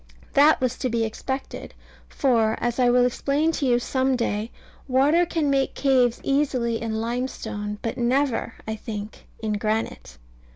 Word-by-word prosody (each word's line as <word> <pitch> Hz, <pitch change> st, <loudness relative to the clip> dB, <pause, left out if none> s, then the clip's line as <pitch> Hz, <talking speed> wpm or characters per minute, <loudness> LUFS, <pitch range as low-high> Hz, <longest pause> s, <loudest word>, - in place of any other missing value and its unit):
That 295 Hz, +2 st, +6 dB
was 255 Hz, -1 st, -1 dB
to 255 Hz, -, -1 dB
be 230 Hz, -1 st, 0 dB
expected; 265 Hz, +5 st, -5 dB, 0.3 s
for, 230 Hz, -5 st, +1 dB
as 240 Hz, +1 st, -1 dB
I 245 Hz, -1 st, +4 dB
will 245 Hz, 0 st, +4 dB
explain 280 Hz, +5 st, +1 dB
to 295 Hz, -4 st, -1 dB
you 240 Hz, -1 st, +4 dB
some 260 Hz, +2 st, 0 dB
day, 220 Hz, -2 st, -1 dB, 0.4 s
water 290 Hz, +7 st, +3 dB
can 320 Hz, -3 st, 0 dB
make 270 Hz, -1 st, +1 dB
caves 255 Hz, -4 st, +2 dB
easily 260 Hz, -5 st, 0 dB
in 220 Hz, -1 st, -2 dB
limestone: 225 Hz, -3 st, -3 dB
but 230 Hz, +2 st, -3 dB
never, 245 Hz, -1 st, 0 dB
I 220 Hz, 0 st, -3 dB
think, 210 Hz, 0 st, -7 dB, 0.2 s
in 215 Hz, -1 st, 0 dB
granite. 220 Hz, +1 st, -3 dB
245 Hz, 155 wpm, -24 LUFS, 225-270 Hz, 0.4 s, That